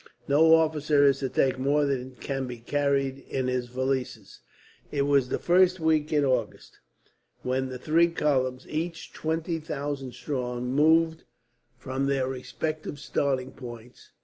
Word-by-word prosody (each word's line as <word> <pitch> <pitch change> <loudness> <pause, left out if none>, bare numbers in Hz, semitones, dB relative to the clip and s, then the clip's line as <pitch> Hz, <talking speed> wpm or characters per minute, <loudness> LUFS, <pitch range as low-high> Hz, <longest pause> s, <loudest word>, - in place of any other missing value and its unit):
No 160 +3 +6
officer 155 -2 +3
is 135 -1 +4
to 135 - -2
take 130 0 +1
more 145 +2 +2
than 130 -2 -3
can 135 0 -4
be 125 -1 -6
carried 140 +2 0
in 130 -1 -1
his 125 -1 -1
valises." 125 -5 -3 0.5
It 140 -1 +1
was 140 -3 +2
the - - 0
first 180 +1 +3
week 160 -1 +1
in 145 -2 +3
August 125 -5 -2 0.6
when 130 +1 -1
the 130 - -5
three 160 +6 +3
columns, 130 -6 0
each 165 +2 -4
twenty 165 +1 -2
thousand 145 -4 -4
strong, 125 -3 -3
moved 160 +3 +3 0.5
from 135 +2 -2
their 135 -2 +1
respective 150 +4 -4
starting 135 -2 -1
points. 120 -2 -11
140 Hz, 145 wpm, -27 LUFS, 130-155 Hz, 0.6 s, No